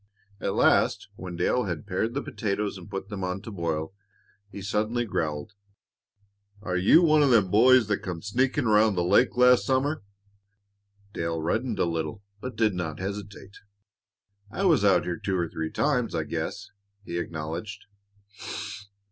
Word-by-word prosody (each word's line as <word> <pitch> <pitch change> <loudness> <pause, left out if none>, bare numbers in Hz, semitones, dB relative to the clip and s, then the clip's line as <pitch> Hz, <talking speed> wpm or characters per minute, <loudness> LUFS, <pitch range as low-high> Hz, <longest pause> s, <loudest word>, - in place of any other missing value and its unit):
At - - -2
last, - - +3
when 90 -2 -7
Dale 100 +8 +1
had 85 -1 -4
pared 105 +5 -2
the 140 - -1
potatoes 105 -2 -2
and 90 -1 -11
put 95 0 -5
them 100 -3 -5
on 90 +1 -2
to 110 - -7
boil, 80 -3 -3 0.6
he 100 - -9
suddenly 110 +4 -1
growled, 80 -1 -3 1.1
"Are 90 -3 -2
you 100 - +5
one 155 -2 +5
of 145 - +4
them 105 -7 +4
boys 125 +3 +6
that 105 -1 -1
come 90 -3 -6
sneakin' 130 +6 0
around 110 -1 +4
the 90 - +1
lake 100 +8 +3
last 125 0 +6
summer?" 140 +3 0 1.1
Dale 85 0 -2
reddened 110 +8 -1
a - - +2
little, 85 +3 -3 0.2
but 130 +2 -6
did 110 -2 +2
not 85 -4 -4
hesitate. 100 0 -7 0.9
"I 190 - -3
was 160 - +4
out 100 -2 +4
here 85 -1 -3
two 95 -2 -1
or 85 -1 0
three 80 0 -4
times, 125 - 0
I 80 - 0
guess," - - -5 0.3
he 85 -2 -3
acknowledged. 80 +4 -5
100 Hz, 160 wpm, -26 LUFS, 85-120 Hz, 1.1 s, boys